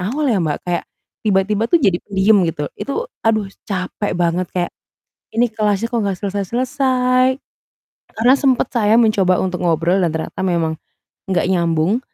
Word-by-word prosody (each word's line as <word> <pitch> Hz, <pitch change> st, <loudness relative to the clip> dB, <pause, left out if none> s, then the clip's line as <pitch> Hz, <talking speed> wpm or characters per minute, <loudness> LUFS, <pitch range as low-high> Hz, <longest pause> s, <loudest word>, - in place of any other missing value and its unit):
awal 260 Hz, +12 st, -1 dB
ya, 220 Hz, -, +2 dB
Mbak. 150 Hz, -2 st, -1 dB
Kayak, 175 Hz, -, -1 dB, 0.4 s
tiba-tiba 205 Hz, +2 st, +1 dB
tuh 345 Hz, -, +5 dB
jadi 190 Hz, -7 st, +2 dB
pendiam, 200 Hz, +1 st, +3 dB
gitu. 150 Hz, -3 st, -3 dB
Itu 455 Hz, -, -3 dB, 0.2 s
aduh 215 Hz, -2 st, +2 dB, 0.2 s
capek 195 Hz, +1 st, -3 dB
banget 175 Hz, +1 st, 0 dB
kayak, 175 Hz, -1 st, -1 dB, 0.6 s
ini 235 Hz, +2 st, +3 dB
kelasnya 215 Hz, -1 st, 0 dB
kok 235 Hz, -, 0 dB
nggak 195 Hz, -2 st, -1 dB
selesai-selesai. 255 Hz, +5 st, +1 dB, 0.8 s
Karena 245 Hz, +4 st, +4 dB
sempat 265 Hz, -2 st, +2 dB
saya 215 Hz, -2 st, +3 dB
mencoba 195 Hz, -5 st, +3 dB
untuk 180 Hz, -1 st, -2 dB
ngobrol 170 Hz, +3 st, +2 dB
dan 165 Hz, -, +1 dB
ternyata 160 Hz, +3 st, -4 dB
memang 165 Hz, -3 st, 0 dB, 0.6 s
nggak 185 Hz, -, +1 dB
nyambung. 170 Hz, +5 st, +1 dB
200 Hz, 150 wpm, -18 LUFS, 180-235 Hz, 0.8 s, tuh